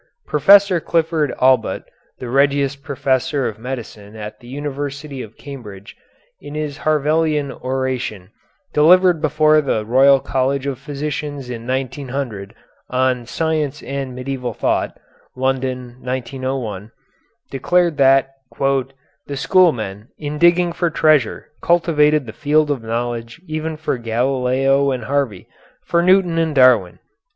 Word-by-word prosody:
Professor 195 +4 +5
Clifford 160 -3 0
Allbutt, 130 0 +2 0.3
the 125 - -7
Regius 140 +2 +2
Professor 140 -1 -1
of 105 - -6
Medicine 110 -4 -7
at 105 0 -8
the 120 - -15
University 140 0 -5
of 110 -2 -11
Cambridge, 105 -9 -10 0.4
in 145 +1 -9
his 150 -1 -4
Harveian 155 -1 +1
Oration, 130 -8 -4 0.4
delivered 175 +2 +5
before 155 0 +3
the 110 -7 -1
Royal 135 +4 +5
College 135 +1 -1
of 135 -3 -3
Physicians 145 -2 -5
in 115 0 -7
1900, 130 -5 -4 0.3
on 125 -2 0
"Science 155 -2 -2
and 135 -2 -5
Medieval 125 -2 -4
Thought" - - -1 0.4
(London, 130 -1 -2
1901), 125 -4 -4 0.6
declared 170 +4 +1
that 135 0 +4 0.3
"the 135 +1 -3
schoolmen, 120 - +2
in 150 0 -5
digging 175 +1 +4
for 175 0 0
treasure, 155 -7 +2
cultivated 155 -4 +3
the 110 - -8
field 150 0 +1
of 135 -5 -2
knowledge 115 +2 -4
even 155 -1 -4
for 150 -5 -2
Galileo 130 +3 +1
and 130 -3 -2
Harvey, 130 -6 -2 0.4
for 170 - +2
Newton 180 -2 +3
and 160 -2 0
Darwin." 125 -9 +4
135 Hz, 120 wpm, -19 LUFS, 125-150 Hz, 0.6 s, Professor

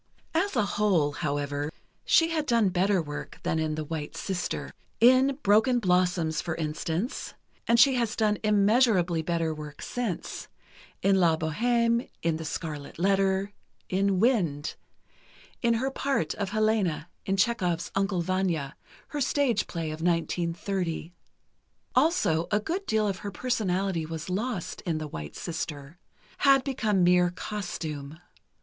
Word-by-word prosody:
As 360 +3 +1
a 215 -4 +3
whole, 195 -8 +2
however, 145 0 -2 0.3
she 330 0 +5
had 310 -2 -1
done 230 -5 +3
better 185 0 +2
work 145 -1 -7
than 160 - 0
in 155 -1 -1
"The 155 - -3
White 150 -1 -5
Sister." 180 -2 -3 0.3
In 255 +3 +5
"Broken 220 +5 +4
Blossoms," 180 -5 +1
for 160 - -3
instance—and 165 - -2
she 275 +1 +7
has 235 -4 0
done 210 -2 +1
immeasurably 205 -5 +3
better 165 -1 -1
work 150 -1 -9
since: 240 -8 -4 0.6
in 195 0 +4
"La 165 -3 +4
Bohême," 235 +9 +1
in 165 -1 +1
"The 160 - -6
Scarlet 155 -2 -5
Letter," 195 +2 +2 0.4
in 195 0 +1
"Wind," 180 - +1 0.9
in 235 -1 +3
her 260 +4 -1
part 270 - -1
of 200 -2 -3
Helena 215 -7 +1 0.2
in 195 0 +1
Chekhov's 180 -5 +1
"Uncle 195 -3 0
Vanya," 170 -6 -1 0.3
her 290 0 -3
stage 260 -5 +1
play 165 -3 -3
of 155 +1 -6
1930. 170 0 -1 0.8
Also, 215 - +2
a 210 - +2
good 360 - -3
deal 215 -1 +2
of 195 -2 -2
her 205 - -5
personality 190 -6 -1
was 160 +2 -5
lost 210 -1 -3
in 165 -3 -2
"The 155 -1 -4
White 75 - -7
Sister"—had 170 - -1
become 220 -9 +1
mere 180 0 +5
costume. 160 -7 -5
185 Hz, 135 wpm, -27 LUFS, 160-220 Hz, 0.9 s, she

